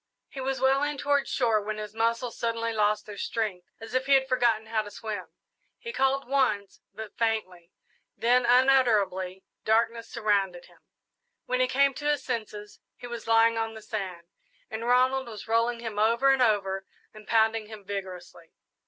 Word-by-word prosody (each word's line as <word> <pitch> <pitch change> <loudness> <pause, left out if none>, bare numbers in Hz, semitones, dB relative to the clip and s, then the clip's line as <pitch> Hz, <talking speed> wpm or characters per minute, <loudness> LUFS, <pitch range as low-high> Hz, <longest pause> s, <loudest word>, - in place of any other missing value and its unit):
He 270 - -7
was 265 0 -2
well 265 +1 +3
in 290 0 -1
toward 285 0 +1
shore 230 -5 +1
when 215 +1 -4
his 210 -1 -6
muscles 230 +2 -1
suddenly 230 0 -2
lost 210 -1 +1
their 205 -1 -9
strength 195 -6 -3
as 225 +1 -10
if 260 +1 0
he 280 - +4
had 265 0 +2
forgotten 240 -4 +2
how 220 0 0
to 210 - -9
swim. 210 -3 -6 0.5
He 465 - -7
called 270 0 +1
once, 255 -7 0
but 220 -2 -9
faintly, 185 -7 -2 0.5
then 245 +2 +3
unutterable 225 -8 +3 0.2
darkness 230 +1 +1
surrounded 200 -5 0
him. - - -22 0.7
When 255 0 -1
he 255 - +3
came 275 +2 +3
to 295 +2 -2
his 295 - 0
senses 215 -4 -5 0.2
he - - -10
was 235 -2 -7
lying 225 0 +4
on 225 0 -3
the 220 - -9
sand, 190 -6 -5 0.5
and 225 +2 -4
Ronald 255 +1 +3
was 220 -2 -9
rolling 230 +1 +1
him 220 -3 -4
over 235 +5 +4
and 270 -1 +2
over 195 -4 +1 0.3
and 215 -1 -14
pounding 220 -1 +2
him 215 -2 -11
vigorously. 185 -4 -7
225 Hz, 175 wpm, -27 LUFS, 210-250 Hz, 0.7 s, he